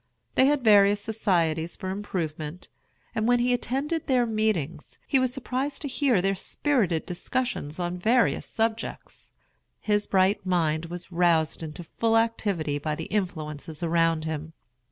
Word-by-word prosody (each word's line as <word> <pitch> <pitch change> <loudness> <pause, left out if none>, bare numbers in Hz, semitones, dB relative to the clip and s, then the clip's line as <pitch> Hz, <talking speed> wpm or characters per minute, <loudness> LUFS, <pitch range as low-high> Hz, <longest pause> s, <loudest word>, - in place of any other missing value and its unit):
They 260 - +5
had 290 -2 +2
various 205 -2 +6
societies 170 -7 0
for 185 - -4
improvement; 170 -4 -4 0.4
and 220 -1 0
when 245 0 +5
he 245 +1 +2
attended 275 +6 -2
their 255 -3 +3
meetings, 215 -9 -1
he 270 - +2
was 255 -1 +1
surprised 270 +3 -3
to - - -2
hear 260 -8 +2
their 195 0 +2
spirited 195 - 0
discussions 180 - -3
on 175 0 -3
various 235 +6 +2
subjects. 225 0 -3 0.5
His 210 -1 +1
bright 190 +1 +2
mind 165 -3 +1
was 175 +2 -8
roused 170 -3 +2
into 160 +2 -6
full 225 +7 +1
activity 200 -10 0
by 155 +1 -2
the 165 - -5
influences 155 -5 -3
around 165 -1 +2
him. 160 0 -4
190 Hz, 145 wpm, -26 LUFS, 165-230 Hz, 0.5 s, various